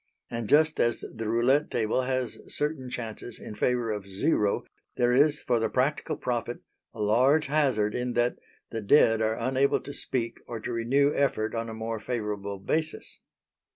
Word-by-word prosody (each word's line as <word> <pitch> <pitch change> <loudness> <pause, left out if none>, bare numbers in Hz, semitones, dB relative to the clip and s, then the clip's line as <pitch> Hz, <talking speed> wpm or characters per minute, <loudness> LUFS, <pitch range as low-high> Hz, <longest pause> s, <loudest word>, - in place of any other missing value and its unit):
And 115 -2 -4
just 155 +1 +4
as 120 0 +1
the 110 -1 -3
roulette 130 +6 +3
table 115 +2 0
has 130 -1 -2
certain 145 -4 -2
chances 120 -1 -6
in - - -8
favour 120 0 0
of 105 -2 -4
Zero, 100 +1 +1 0.3
there 120 0 +3
is 145 +3 +4
for 120 -2 +1
the 110 -1 0
practical 135 +4 0
prophet 120 -1 -3 0.3
a 115 - -13
large 125 +9 +3
hazard 135 -8 +1
in 125 0 -2
that 120 +1 +1 0.3
the 115 - -3
dead 115 0 +5
are 110 0 +1
unable 130 +3 +2
to 145 - -8
speak 115 -4 -3
or 115 -2 -5
to 120 - -4
renew 135 +5 +2
effort 110 -6 0
on 115 0 -3
a 110 - -6
more 110 0 -4
favourable 105 -4 -3
basis. 155 +11 -3
120 Hz, 170 wpm, -27 LUFS, 110-135 Hz, 0.3 s, dead